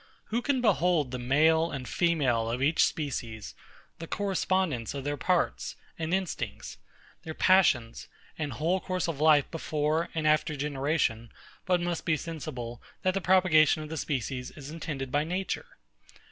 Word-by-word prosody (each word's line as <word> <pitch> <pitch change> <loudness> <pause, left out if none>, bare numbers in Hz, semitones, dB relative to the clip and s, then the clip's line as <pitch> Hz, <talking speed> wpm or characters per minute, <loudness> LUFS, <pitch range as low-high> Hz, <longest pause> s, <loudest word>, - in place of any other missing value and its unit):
Who 235 - +2
can 265 -1 0
behold 170 - +2
the 125 - -4
male 160 +6 +3
and 135 -5 -5
female 135 -10 +1
of 120 +2 -2
each 150 +5 +3
species, 120 -8 -3 0.5
the 165 - -7
correspondence 185 - -1
of 140 - -4
their 145 +1 -1
parts 180 +5 0 0.2
and 160 0 -2
instincts, 125 - -3 0.4
their 160 -1 -7
passions, 145 -12 +3 0.3
and 150 -4 -3
whole 165 +9 0
course 185 -1 -2
of 155 -4 -3
life 155 -3 +5
before 155 0 -1
and 160 -1 -1
after 155 0 +2
generation, 140 -5 -1 0.4
but 180 -1 +3
must 175 -1 -2
be 155 -2 +1
sensible, 125 -7 -6 0.2
that 185 - +2
the 195 - -1
propagation 165 -5 +4
of 155 - -8
the 160 - -4
species 130 -3 -3
is 145 -1 -10
intended 145 -5 -5
by 145 +2 +2
Nature? 185 +4 -3
155 Hz, 155 wpm, -28 LUFS, 135-175 Hz, 0.5 s, life